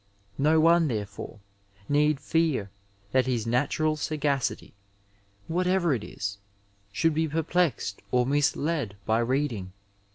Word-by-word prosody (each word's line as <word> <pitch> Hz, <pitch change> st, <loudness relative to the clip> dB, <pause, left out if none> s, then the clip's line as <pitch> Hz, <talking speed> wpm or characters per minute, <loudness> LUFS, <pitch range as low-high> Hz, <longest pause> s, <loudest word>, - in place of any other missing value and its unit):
No 155 Hz, +3 st, +4 dB
one 165 Hz, +1 st, +5 dB
therefore 105 Hz, -3 st, -5 dB, 0.5 s
need 150 Hz, 0 st, +2 dB
fear 145 Hz, -, 0 dB, 0.4 s
that 130 Hz, 0 st, +2 dB
his 120 Hz, -4 st, 0 dB
natural 145 Hz, +6 st, +1 dB
sagacity, 145 Hz, -3 st, -2 dB, 0.7 s
whatever 180 Hz, -1 st, +1 dB
it 115 Hz, -5 st, -2 dB
is, 100 Hz, 0 st, -5 dB, 0.5 s
should 165 Hz, +10 st, +1 dB
be 160 Hz, +1 st, +1 dB
perplexed 160 Hz, -, 0 dB
or 125 Hz, -1 st, +2 dB
misled 145 Hz, -3 st, 0 dB
by 110 Hz, +1 st, +2 dB
reading. 120 Hz, -6 st, -1 dB
145 Hz, 110 wpm, -27 LUFS, 120-160 Hz, 0.7 s, one